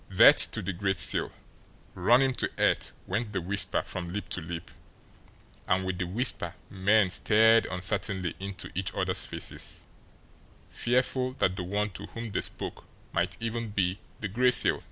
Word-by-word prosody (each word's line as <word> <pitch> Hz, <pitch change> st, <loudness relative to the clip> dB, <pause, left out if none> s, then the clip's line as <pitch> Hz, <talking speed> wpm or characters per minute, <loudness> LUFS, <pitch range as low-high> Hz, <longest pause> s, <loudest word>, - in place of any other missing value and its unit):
"Death -, -, +8 dB
to -, -, -3 dB
the 95 Hz, +2 st, -3 dB
Gray 95 Hz, +2 st, -1 dB
Seal! 85 Hz, -, +1 dB, 0.6 s
Run 120 Hz, +9 st, +4 dB
him 135 Hz, -1 st, +1 dB
to -, -, -1 dB
earth!" -, -, +1 dB
went 105 Hz, +3 st, -3 dB
the 95 Hz, -, 0 dB
whisper 100 Hz, +3 st, -1 dB
from 85 Hz, -2 st, -6 dB
lip 105 Hz, +3 st, -5 dB
to 95 Hz, -, -3 dB
lip; 85 Hz, +1 st, -7 dB, 1.0 s
and 95 Hz, 0 st, +1 dB
with 95 Hz, -1 st, -3 dB
the 90 Hz, -, -2 dB
whisper 95 Hz, -3 st, 0 dB, 0.2 s
men 100 Hz, 0 st, +2 dB
stared 110 Hz, +3 st, +4 dB
uncertainly 95 Hz, -1 st, -2 dB
into 100 Hz, 0 st, -6 dB
each 95 Hz, +1 st, -2 dB
other's -, -, +1 dB
faces, -, -, -1 dB, 0.9 s
fearful 125 Hz, +1 st, 0 dB
that 95 Hz, -8 st, 0 dB
the 95 Hz, -, -4 dB
one 105 Hz, +3 st, -2 dB
to 100 Hz, +2 st, -9 dB
whom 115 Hz, -1 st, -7 dB
they -, -, -1 dB
spoke -, -, -5 dB, 0.3 s
might 85 Hz, +2 st, -1 dB
even 115 Hz, 0 st, -4 dB
be 100 Hz, -1 st, -1 dB, 0.2 s
the 105 Hz, -, -2 dB
Gray 125 Hz, +6 st, +2 dB
Seal! 125 Hz, -, +5 dB
100 Hz, 165 wpm, -28 LUFS, 90-115 Hz, 1.0 s, Death